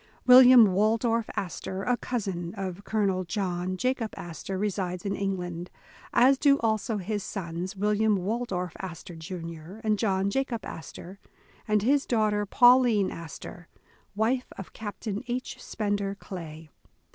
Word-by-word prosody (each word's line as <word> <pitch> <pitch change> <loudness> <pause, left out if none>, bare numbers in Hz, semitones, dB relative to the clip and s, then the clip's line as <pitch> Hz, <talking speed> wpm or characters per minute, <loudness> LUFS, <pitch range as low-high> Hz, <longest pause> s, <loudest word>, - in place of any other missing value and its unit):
William 250 -5 +9
Waldorf 225 +3 +1
Astor, 190 +1 -4
a 245 +2 +2
cousin 190 -9 -4
of 190 0 -5
Colonel 200 -4 0
John 185 -1 -2
Ja 255 +1 +2
cob 230 -4 -4
Astor, 175 +3 -6
resides 185 -3 -2
in 195 - -1
England, 180 -3 -3 0.4
as 265 +2 +5
do 280 -2 +5
also 220 -1 0
his 205 +2 -3
sons, 180 0 -5
Wil 210 +2 +1
liam 215 -1 +2
Waldorf 190 -3 -2
Astor, 175 -1 -7
Jr., 165 0 -8
and 215 -2 +1
John 195 -2 +1
Jacob 245 -3 -2
Astor, 175 +4 -9 0.5
and 210 -1 +2
his 280 +4 +2
daughter, 210 -3 +1
Pauline 245 -4 +5
Astor, 170 +1 -9 0.5
wife 240 +4 +1
of 195 - -9
Captain 210 0 -5
H. 250 +1 -4
Spender 205 -2 -2
Clay. 160 -6 -9
200 Hz, 135 wpm, -27 LUFS, 180-225 Hz, 0.5 s, William